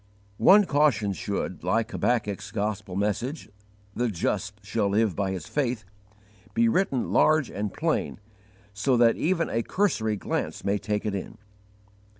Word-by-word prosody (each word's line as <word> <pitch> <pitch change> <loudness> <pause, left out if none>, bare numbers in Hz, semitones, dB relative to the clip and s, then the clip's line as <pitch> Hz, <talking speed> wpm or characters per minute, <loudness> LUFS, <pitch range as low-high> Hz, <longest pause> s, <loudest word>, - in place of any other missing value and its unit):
One 205 +1 +7
caution 145 - +2
should, 95 -1 -4
like 110 +6 0
Habakkuk's 105 -7 -1
gospel 105 -2 -3
message 105 +9 -2 0.5
"The 120 0 0
just 100 +2 -3
shall 105 0 0
live 105 -2 +1
by 100 -1 -1
his 95 -4 -4
faith" 125 -6 -2 0.7
be 235 0 +4
written 185 - +1
large 155 -4 +3
and 105 0 -3
plain 160 - -1 0.5
so 125 +6 +1
that 115 -1 +5
even 165 0 0
a 115 - -1
cursory 115 - 0
glance - - -3
may 100 +1 +1
take 105 0 -2
it 105 - -1
in. 100 - -5
110 Hz, 145 wpm, -26 LUFS, 100-135 Hz, 0.7 s, One